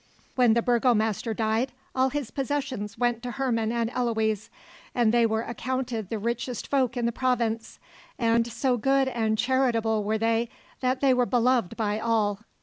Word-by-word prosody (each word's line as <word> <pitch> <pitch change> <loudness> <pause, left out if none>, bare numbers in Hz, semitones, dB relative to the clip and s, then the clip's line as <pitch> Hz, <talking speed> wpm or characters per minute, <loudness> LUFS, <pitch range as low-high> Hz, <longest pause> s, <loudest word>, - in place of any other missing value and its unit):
When 245 -3 +4
the 235 - +2
burgomaster 230 -3 +1
died 225 +4 0 0.2
all 260 0 +2
his 270 -4 -4
possessions 265 -7 -3
went 240 -1 0
to 250 - -5
Herman 235 -4 -1
and 235 0 -1
Eloise; 220 -4 -1 0.5
and 235 -2 +3
they 235 -1 +4
were 220 0 -1
accounted 240 -3 -3
the 225 - -2
richest 235 +3 -3
folk 260 -3 0
in 240 - 0
the 235 - +1
province, 235 -3 -1 0.4
and 230 -1 +2
so 255 +1 +1
good 270 +3 +2
and 225 -4 0
charitable 230 -4 +1
were 215 +2 0
they 225 +1 +1 0.3
that 255 0 0
they 270 -2 +5
were 250 -1 +2
beloved 245 -4 +1
by 215 -2 0
all. 220 -3 +1
235 Hz, 165 wpm, -26 LUFS, 220-255 Hz, 0.5 s, they